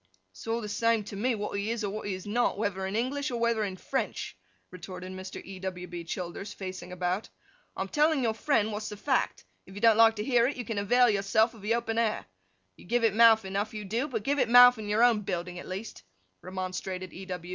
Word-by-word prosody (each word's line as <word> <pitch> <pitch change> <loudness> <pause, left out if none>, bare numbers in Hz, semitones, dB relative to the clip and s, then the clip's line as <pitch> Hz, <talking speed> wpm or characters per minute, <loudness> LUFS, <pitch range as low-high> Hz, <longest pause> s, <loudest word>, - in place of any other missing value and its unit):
'It's 95 - -13
all 230 +1 0
the 210 - -5
same 230 +1 +1
to 200 - -8
me 235 +4 0
what 210 -1 -4
he 205 +2 -2
is 230 -1 -2
or 200 - -2
what 215 - -5
he 195 - -2
is 185 - -9
not, 225 0 0
whether 195 -2 -2
in 195 - -4
English 265 +5 -1
or 240 -2 -3
whether 230 -2 +1
in 190 -2 -4
French,' - - -3 0.4
retorted 185 0 -8
Mr. 185 0 -7
E. 190 -1 -9
W. 185 -1 -5
B. 175 -1 -7
Childers, 180 +4 -5
facing 185 -2 -7
about. 180 +3 -2 0.5
'I - - -2
am - - -7
telling 300 -2 +2
your 225 -2 +1
friend 220 -3 +1
what's 210 +1 -4
the 210 - -8
fact; 260 +6 -1 0.2
if 190 - -13
you - - -6
don't 225 0 +5
like 225 0 +6
to 210 - -3
hear 240 -1 +3
it, 275 - -3
you 245 - -5
can 215 -1 -2
avail 245 +5 +4
yourself 220 +2 +2
of 220 - -14
the 215 +3 +1
open 230 -1 -1
air. 225 -2 0 0.5
You - - -15
give 235 +5 0
it 225 -3 +3
mouth 225 -1 +6
enough, 200 +3 -3
you 210 -1 -5
do; 230 +8 -1
but 225 -7 -3
give 285 +4 0
it - - +2
mouth 245 0 +8
in 210 -1 -6
your 215 +3 +3
own 235 -3 +4
building 180 -2 -4
at - - -10
least,' 195 - -6 0.4
remonstrated 185 0 -5
E. 190 +1 -9
210 Hz, 245 wpm, -29 LUFS, 190-230 Hz, 0.5 s, mouth